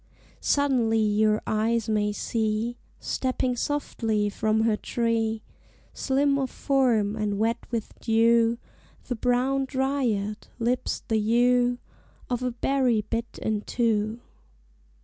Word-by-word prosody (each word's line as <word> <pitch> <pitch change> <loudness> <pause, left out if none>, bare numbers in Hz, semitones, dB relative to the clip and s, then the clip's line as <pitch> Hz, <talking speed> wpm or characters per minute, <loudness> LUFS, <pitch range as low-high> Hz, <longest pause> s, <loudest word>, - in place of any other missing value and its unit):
Suddenly 255 -6 +2
your 215 0 +2
eyes 220 +1 0
may 210 -1 +1
see, 220 +2 -1 0.2
Stepping 255 -1 -1
softly 225 -6 -1
from 220 +1 +1
her 220 -1 +2
tree, 225 -1 -1 0.5
Slim 280 +1 +1
of 265 -1 -1
form 240 -8 +1
and 210 -2 -1
wet 230 +3 +1
with 230 -3 -3
dew, 230 0 +3 0.5
The 245 - -3
brown 255 +3 +1
dryad; 260 -7 -1
lips 240 +1 -1
the 220 -2 +1
hue 245 +3 +3 0.5
Of 245 0 0
a 255 - 0
berry 245 -2 +1
bit 230 0 -3
into. 220 0 0
230 Hz, 110 wpm, -26 LUFS, 215-250 Hz, 0.5 s, dew